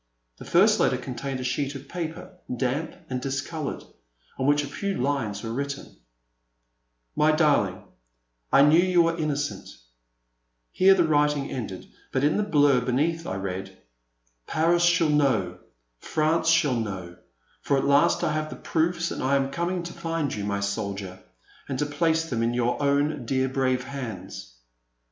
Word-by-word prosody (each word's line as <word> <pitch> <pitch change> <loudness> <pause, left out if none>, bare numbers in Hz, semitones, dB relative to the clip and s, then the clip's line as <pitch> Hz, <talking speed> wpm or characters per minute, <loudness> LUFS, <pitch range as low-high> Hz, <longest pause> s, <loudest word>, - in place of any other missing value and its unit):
The - - -11
first 210 +5 +4
letter 130 - +2
contained 130 +1 -5
a - - -4
sheet 135 +2 -2
of 135 +1 -9
paper, 175 +2 -6 0.3
damp 135 +6 -2
and 125 -3 -3
discoloured, 135 +3 -4 0.6
on 130 - 0
which 145 0 +3
a - - -5
few 195 +7 -3
lines 125 -7 -1
were 115 - -4
written: 140 +2 -5 1.2
My 155 +1 +4
darling, 145 - +2 0.7
I 140 - +7
knew 155 +4 +6
you 180 -1 +4
were 165 0 +1
innocent 145 -3 -3 0.5
— - - -50
Here 195 +1 +5
the 180 - +3
writing 150 -2 +1
ended, 105 -7 -5 0.3
but, 130 - 0
in 150 +2 +3
the - - +2
blur 145 -9 +3
beneath, 155 +7 0
I - - -3
read: 95 0 -5 0.7
Paris 170 +2 +2
shall 175 -2 +4
know 115 -12 +1 0.2
— - - -49
France 160 +1 +2
shall 155 -6 +3
know, 95 -5 -5 0.4
for 140 - +1
at - - 0
last 140 +4 +3
I 165 - +1
have 155 0 -2
the - - -7
proofs 170 +1 -1
and - - -4
I 135 +2 +2
am 135 0 0
coming 175 +2 -2
to 175 - -7
find 165 -4 -2
you, 105 - -4
my 100 0 -2
soldier, 100 -2 -4 0.5
and 135 - -2
to 150 - 0
place 160 +2 0
them 120 -6 -2
in 115 +1 0
your 120 +3 0
own 140 -2 +1
dear 130 0 +1
brave 130 -1 0
hands. 95 - -7
140 Hz, 165 wpm, -25 LUFS, 120-160 Hz, 1.2 s, I